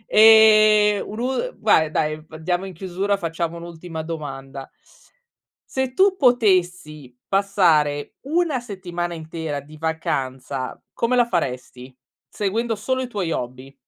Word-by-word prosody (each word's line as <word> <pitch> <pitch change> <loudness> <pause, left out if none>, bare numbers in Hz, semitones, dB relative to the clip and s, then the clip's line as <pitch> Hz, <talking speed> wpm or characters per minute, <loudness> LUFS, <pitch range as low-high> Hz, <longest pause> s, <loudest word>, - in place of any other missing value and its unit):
Ehm, 215 -1 +7
un'ul 255 - -3
vai 160 -1 +3
dai, 155 0 -1
andiamo 175 +4 -3
in 190 - -8
chiusura, 190 +3 -2
facciamo 170 -1 -3
un'ultima 170 -1 -7
domanda. 135 -4 -7 1.1
Se 265 0 +1
tu 385 0 +4
potessi 180 - +1
passare 170 -7 +1
1 320 -3 +1
settimana 175 -6 -5
intera 160 -2 -5
di 145 +2 -14
vacanza, 135 -5 -3
come 235 +2 0
la 245 -1 +4
faresti? 130 - -4 0.4
Seguendo 225 +3 -1
solo 260 +5 -2
i 255 - -3
tuoi 200 -8 -3
hobby. 130 0 -5
175 Hz, 115 wpm, -22 LUFS, 155-215 Hz, 1.1 s, Ehm